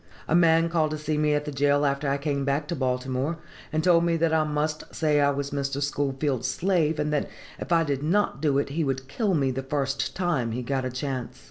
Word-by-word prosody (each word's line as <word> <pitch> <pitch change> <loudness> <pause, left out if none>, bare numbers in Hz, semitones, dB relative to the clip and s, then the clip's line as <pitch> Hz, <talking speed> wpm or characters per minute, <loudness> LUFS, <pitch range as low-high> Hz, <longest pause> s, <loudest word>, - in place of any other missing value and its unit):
"A - - 0
man 165 -1 +5
called 165 -2 +1
to 155 - -3
see 150 0 -2
me 150 0 +2
at 145 0 -1
the 150 - -4
jail 145 +1 +2
after 140 0 0
I 140 - +1
came 140 -1 -1
back 140 +2 0
to 170 - -1
Baltimore, 130 +3 -1 0.3
and 155 0 0
told 170 -1 +5
me 170 -1 +2
that 165 0 +1
I 160 -1 +3
must 150 0 -3
say 150 -2 +2
I 140 - +4
was 140 0 -2
Mr. 140 0 -2
Schoolfield's 140 -2 -1
slave, 160 +1 +1
and 150 0 -1
that 150 - 0 0.3
if - - -7
I 165 -1 +4
did 140 -3 -2
not 170 -1 +1
do 145 -3 +2
it 140 - 0
he 160 +4 -1
would 135 -2 -2
kill 195 - 0
me 135 -3 +1
the 130 +1 -3
first 135 0 -2
time 155 -11 0
he 125 +2 -3
got 130 +1 -1
a - - -1
chance. 130 -1 -4
145 Hz, 240 wpm, -26 LUFS, 135-155 Hz, 0.3 s, man